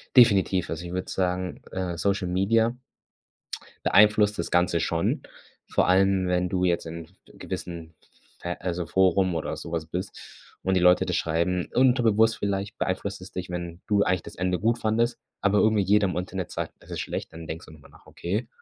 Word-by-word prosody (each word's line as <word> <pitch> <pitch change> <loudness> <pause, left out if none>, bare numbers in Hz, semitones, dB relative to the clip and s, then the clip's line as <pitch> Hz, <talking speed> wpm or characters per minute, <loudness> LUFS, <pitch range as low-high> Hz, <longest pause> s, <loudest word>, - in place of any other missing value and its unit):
Definitiv, 100 -7 +5
also 80 +2 -4
ich 85 - -6
würde 95 0 -3
sagen, 90 -1 -2
äh, 90 -3 -3
Social 100 +1 0
Media 110 +6 +2 1.1
beeinflusst 105 0 +5
das 85 - -2
Ganze 90 -1 +2
schon. 85 0 0 0.5
Vor - - +1
allem 95 0 +3
wenn 90 0 +1
du 90 0 0
jetzt 85 -2 +1
in 80 0 -7
f 85 - -25
gewissen 85 -2 -7 0.5
ver 90 0 -5
also, 90 -1 -2
Forum 95 0 +2
oder 80 - -3
so 85 - -8
was 80 -2 -2
bist 90 +4 -5 0.5
und 95 0 +1
die - - +4
Leute 90 0 +5
das - - -1
schreiben. 85 +2 0
Unterbewusst 115 -4 +4
vielleicht 100 0 -3
beeinflusst 95 +1 -2
es 95 - -10
dich, 90 -1 -5
wenn 85 0 -5
du 100 -2 +3
eigentlich 90 -2 0
das - - -10
Ende 90 0 -1
gut 115 +2 +1
fandest, 115 +2 0 0.2
aber 100 +1 +3
irgendwie 110 -2 +3
jeder 100 +2 +3
im 90 - -3
Internet 95 0 -4
sagt, - - -4
das - - -16
ist - - -4
schlecht, - - -5
dann 80 0 -9
denkst 80 +1 -6
du 80 - -14
noch 75 - -16
mal - - -17
nach: - - -20
„Okay?“ 105 +7 -3
90 Hz, 195 wpm, -26 LUFS, 85-100 Hz, 1.1 s, Definitiv